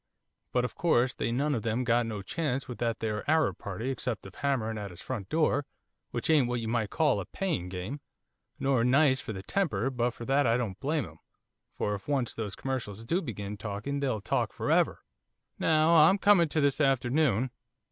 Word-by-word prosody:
But 125 Hz, 0 st, +2 dB
of -, -, -5 dB
course 130 Hz, -7 st, +2 dB
they -, -, -2 dB
none 145 Hz, +5 st, +1 dB
of 120 Hz, -, -1 dB
them 115 Hz, +3 st, -1 dB
got 120 Hz, -1 st, +2 dB
no 105 Hz, -3 st, -4 dB
chance 135 Hz, -, -2 dB
with 125 Hz, -, -7 dB
that 115 Hz, -1 st, -1 dB
there 105 Hz, -2 st, -2 dB
Arab 160 Hz, 0 st, +2 dB
party 110 Hz, +7 st, -4 dB
except 125 Hz, -6 st, -3 dB
of 95 Hz, -, -10 dB
hammering 115 Hz, -6 st, -1 dB
at 100 Hz, -1 st, -5 dB
his 85 Hz, -, -12 dB
front 110 Hz, -7 st, -5 dB
door, 155 Hz, -3 st, +2 dB, 0.5 s
which -, -, -3 dB
ain't 150 Hz, -6 st, +4 dB
what 120 Hz, 0 st, -1 dB
you 115 Hz, -, -4 dB
might 110 Hz, -2 st, 0 dB
call 150 Hz, -6 st, +2 dB
a 95 Hz, -, -4 dB
paying 170 Hz, -, -2 dB
game, 95 Hz, +10 st, -5 dB, 0.6 s
nor 135 Hz, -4 st, +2 dB
nice 130 Hz, +1 st, +4 dB
for -, -, -6 dB
the 95 Hz, -2 st, -6 dB
temper, 135 Hz, -, 0 dB
but 120 Hz, -1 st, +1 dB
for 120 Hz, -, -7 dB
that 135 Hz, +1 st, +3 dB
I 115 Hz, +1 st, +3 dB
don't 110 Hz, -7 st, -3 dB
blame 150 Hz, -2 st, 0 dB
him, 80 Hz, -2 st, -14 dB, 0.6 s
for 105 Hz, -, -1 dB
if 100 Hz, -1 st, -6 dB
once 135 Hz, -5 st, 0 dB
those 105 Hz, -3 st, -4 dB
commercials 115 Hz, -5 st, -4 dB
do 175 Hz, +10 st, +1 dB
begin 105 Hz, -, -5 dB
talking 105 Hz, +7 st, -4 dB
they'll 130 Hz, -7 st, -1 dB
talk -, -, -1 dB
for -, -, -2 dB
ever. -, -, +2 dB, 0.6 s
'Now 160 Hz, 0 st, +3 dB
I'm 165 Hz, +4 st, +7 dB
coming 195 Hz, -5 st, +5 dB
to 155 Hz, -, +1 dB
this 140 Hz, +1 st, +2 dB
afternoon. 130 Hz, -2 st, +2 dB
125 Hz, 205 wpm, -29 LUFS, 110-145 Hz, 0.6 s, I'm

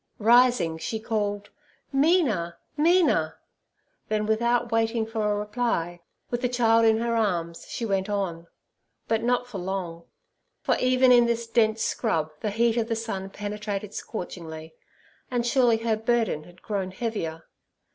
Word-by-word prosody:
Rising, 235 Hz, -7 st, +4 dB
she 220 Hz, +6 st, -3 dB
called, 205 Hz, -2 st, -2 dB, 0.4 s
'Mina, 270 Hz, -, +2 dB, 0.2 s
Mina!' 305 Hz, -, +3 dB, 0.7 s
Then, 215 Hz, 0 st, 0 dB
without 235 Hz, +2 st, +1 dB
waiting 225 Hz, 0 st, +1 dB
for 220 Hz, -2 st, -1 dB
a -, -, +1 dB
reply, 210 Hz, -5 st, -2 dB, 0.3 s
with 240 Hz, 0 st, -1 dB
the 250 Hz, -, +1 dB
child 230 Hz, -2 st, +3 dB
in 220 Hz, -1 st, +5 dB
her 235 Hz, +1 st, 0 dB
arms, 175 Hz, -7 st, -1 dB
she 235 Hz, -, -3 dB
went 195 Hz, -2 st, -1 dB
on; 180 Hz, -5 st, -2 dB, 0.6 s
but 225 Hz, -1 st, +1 dB
not 245 Hz, +1 st, +1 dB
for 230 Hz, -6 st, -7 dB
long, 175 Hz, -3 st, -4 dB, 0.6 s
for -, -, +2 dB
even 255 Hz, 0 st, +4 dB
in 240 Hz, -1 st, +6 dB
this 235 Hz, 0 st, -1 dB
dense 225 Hz, -1 st, +2 dB
scrub 160 Hz, -9 st, -1 dB
the 215 Hz, -, -2 dB
heat 230 Hz, +2 st, +1 dB
of 225 Hz, -1 st, +1 dB
the 230 Hz, -, -1 dB
sun 200 Hz, -4 st, -4 dB
penetrated 205 Hz, 0 st, -5 dB
scorchingly, 160 Hz, -7 st, -7 dB, 0.6 s
and 245 Hz, -2 st, -1 dB
surely 240 Hz, -2 st, +3 dB
her 225 Hz, 0 st, 0 dB
burden 225 Hz, -8 st, 0 dB
had 175 Hz, +1 st, -18 dB
grown 195 Hz, -3 st, -2 dB
heavier. 185 Hz, -6 st, -4 dB
220 Hz, 145 wpm, -26 LUFS, 190-235 Hz, 0.7 s, in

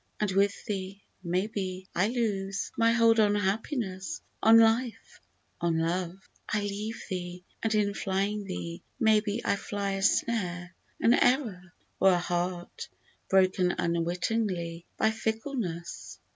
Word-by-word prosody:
and 210 Hz, -2 st, 0 dB
with 200 Hz, +2 st, +1 dB
thee, 195 Hz, -2 st, -4 dB, 0.2 s
may 180 Hz, +2 st, 0 dB
be, 190 Hz, -3 st, -4 dB
I 185 Hz, +4 st, +3 dB
lose 200 Hz, -5 st, -2 dB
My 230 Hz, 0 st, +4 dB
hold 230 Hz, -1 st, +4 dB
on 205 Hz, -1 st, +4 dB
Happiness, 200 Hz, -1 st, -2 dB, 0.2 s
on 225 Hz, +1 st, +7 dB
Life, 225 Hz, 0 st, +2 dB, 0.4 s
on 170 Hz, -1 st, +1 dB
Love; 170 Hz, +2 st, -1 dB, 0.3 s
I 210 Hz, -, +1 dB
leave 205 Hz, +2 st, -4 dB
thee, 180 Hz, -2 st, -5 dB, 0.2 s
and 225 Hz, -1 st, +1 dB
in 205 Hz, -1 st, +2 dB
flying 200 Hz, +2 st, -1 dB
thee, 170 Hz, -2 st, -5 dB, 0.2 s
may 220 Hz, -2 st, +5 dB
be 210 Hz, +2 st, -3 dB
I 200 Hz, -, +2 dB
fly 200 Hz, 0 st, -3 dB
a 195 Hz, 0 st, -2 dB
snare, 185 Hz, -, 0 dB, 0.3 s
an 235 Hz, -, +5 dB
error, 220 Hz, -10 st, +1 dB, 0.3 s
or 190 Hz, -1 st, +6 dB
a -, -, +3 dB
heart 175 Hz, 0 st, -3 dB, 0.4 s
Broken 185 Hz, -1 st, +3 dB
unwittingly 170 Hz, 0 st, -1 dB
by 220 Hz, -, +3 dB
fickleness 220 Hz, -, -4 dB
195 Hz, 135 wpm, -29 LUFS, 180-220 Hz, 0.4 s, on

